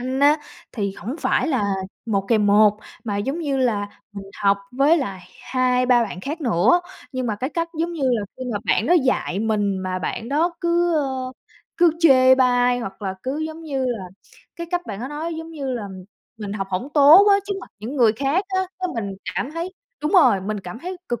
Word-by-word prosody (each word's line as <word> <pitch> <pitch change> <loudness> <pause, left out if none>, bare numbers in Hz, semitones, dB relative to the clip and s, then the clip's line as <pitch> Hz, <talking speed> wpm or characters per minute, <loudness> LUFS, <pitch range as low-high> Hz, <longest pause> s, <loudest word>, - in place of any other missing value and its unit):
Anh 260 +2 -2
á 290 +2 +6 0.4
thì 200 -4 -2
hổng 250 +8 -5
phải - - +1
là 260 -8 +1 0.4
1 200 -3 0
kèm 215 -3 +3
1, 210 +1 +5 0.3
mà 205 -3 -2
giống 270 +11 -2
như 285 -5 -1
là 215 -6 0 0.2
mình 200 -1 -8 0.2
học 200 0 +4
với 280 +6 +4
lại 195 -9 -4 0.2
2-3 250 -1 +2
bạn 185 -4 -7
khác 300 - -5
nữa. 240 - +3 0.3
Nhưng 255 -1 -2
mà 215 -3 -1
cái 260 +7 -3
cách 335 0 -2
giống 340 +1 -1
như 310 -4 -5
là 240 -5 +2
khi 260 - -7
mà 205 - -1
bạn 225 - +1
đó 350 - +4
dạy 225 -7 0
mình 205 -3 0
mà 185 0 -3
bạn 220 +7 -4
đó 330 +5 +1
cứ, 345 0 +2
ơ, 265 -3 -2 0.4
cứ 345 -1 +5
chê 260 -6 +6
bai 245 -1 +3
hoặc 195 -3 -7
là 190 -1 -3
cứ, 270 +4 -3
giống 320 +1 -9
như 275 -4 -2
là, 230 -6 -3 0.5
cái 340 0 -5
cách 355 -1 -2
bạn 205 0 -6
đó 260 - -4
nói 315 +3 -4
giống 325 +1 -7
như 275 -5 -4
là 215 -4 -4 0.5
mình 205 -2 -5
học 195 -2 -3
hổng 190 +9 -2
tốt 300 +7 +8
á 400 - +7
trước 405 - -2
mặt - - -12
những 235 +7 -6
người 235 -5 +5
khác 280 - 0
á. 380 -1 0 0.2
Cái, 370 -1 -2
mình 200 -4 -4 0.2
cảm 270 - -2
thấy 335 +3 -5 0.3
đúng 300 - -1
rồi, 320 - +5
mình 205 +2 -4
cảm 180 +4 -8
thấy 365 +5 -6
cực 240 -2 -2
255 Hz, 220 wpm, -22 LUFS, 210-310 Hz, 0.5 s, tốt